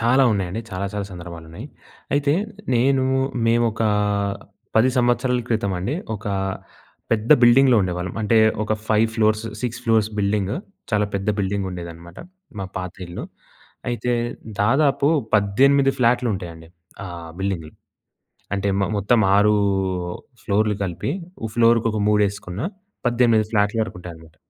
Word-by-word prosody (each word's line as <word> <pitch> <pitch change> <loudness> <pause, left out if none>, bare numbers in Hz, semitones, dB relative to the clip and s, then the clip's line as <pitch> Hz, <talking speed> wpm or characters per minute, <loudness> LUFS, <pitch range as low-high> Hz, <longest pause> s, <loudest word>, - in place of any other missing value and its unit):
చాలా 125 +4 +4
ఉన్నాయండి. 95 +2 -2
చాలా 95 +1 -3
చాలా 100 -1 -3
సందర్భాలు 85 -2 -9
ఉన్నాయి. 105 - -8 0.5
అయితే 145 0 +2 0.4
నేను 130 +2 +3 0.4
మేము 120 +1 +3
ఒకా 110 0 0 0.9
10 125 +4 +5
సంవత్సరాల 125 +1 +2
క్రితమండి, 100 0 -1 0.2
ఒక 105 +1 -8 0.9
పెద్ద 110 +1 -1
బిల్డింగ్‌లో 125 +1 +6
ఉండేవాళ్ళం. 90 -1 -3
అంటే 110 +2 +3 0.2
ఒక 110 - -1 0.2
5 110 +1 +3
ఫ్లోర్స్, 110 0 +2 0.2
6 125 0 -3
ఫ్లోర్స్ 110 -2 +3
బిల్డింగ్ 100 -1 0 0.4
చాలా 105 -1 +2
పెద్ద 100 +1 -2
బిల్డింగుండేదనమాట. 90 -4 -4 0.4
మా 95 - -3
పాత 90 -1 -4
ఇల్లు. 85 - -6 0.6
అయితే 120 0 -1 0.5
దాదాపు 140 +5 +3 0.3
18 135 +7 +4
ఫ్లాట్లుంటాయండి. 95 -10 0 0.4
ఆహ్, 85 -2 -8
బిల్డింగ్‌లో 90 -6 -3 0.8
అంటే, 100 0 -1
మో 100 - +1
మొత్తం 110 +3 +3
6 105 +1 +5 0.9
ఫ్లోర్‌లు 105 0 +1
కలిపి. 90 -4 -3 0.3
ఉ - - 0
ఫ్లోర్‌‌కి 115 -1 +4
ఒక 110 - -2
మూడేసుకున్న 100 -2 0 0.5
18 120 -2 +3
ఫ్లాట్ల 105 +1 +1
వరకుంటాయన్నమాట. 85 -5 -9
105 Hz, 120 wpm, -22 LUFS, 95-120 Hz, 0.9 s, బిల్డింగ్‌లో